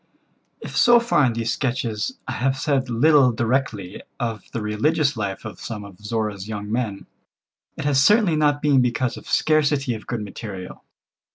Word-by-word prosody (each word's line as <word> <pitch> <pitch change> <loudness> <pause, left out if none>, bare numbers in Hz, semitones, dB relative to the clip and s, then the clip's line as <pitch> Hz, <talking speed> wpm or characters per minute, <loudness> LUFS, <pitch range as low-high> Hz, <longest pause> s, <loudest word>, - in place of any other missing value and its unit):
If - - -8
so 240 0 +6
far 235 - +2
in 120 - +1
these 115 +1 -1
sketches 120 -5 -2
I - - -3
have 135 +4 0
said 135 -2 0
little 130 +2 +5
directly 110 -5 -2 0.2
of 115 -3 -3
the 115 - -3
religious 140 +8 +1
life 100 -1 -4
of 110 - -8
some 110 -3 -6
of 100 -1 -13
Zorra's 105 -2 -3
young 105 -1 -5
men, 110 -4 -2 0.7
it - - -5
has 140 -2 +3
certainly 205 +1 +4
not 145 -1 +1
been 140 -3 +4
because 125 0 0
of - - -11
scarcity 145 -4 +2
of 110 - -9
good 120 -3 -3
material. 100 -2 -8
120 Hz, 170 wpm, -22 LUFS, 105-145 Hz, 0.7 s, so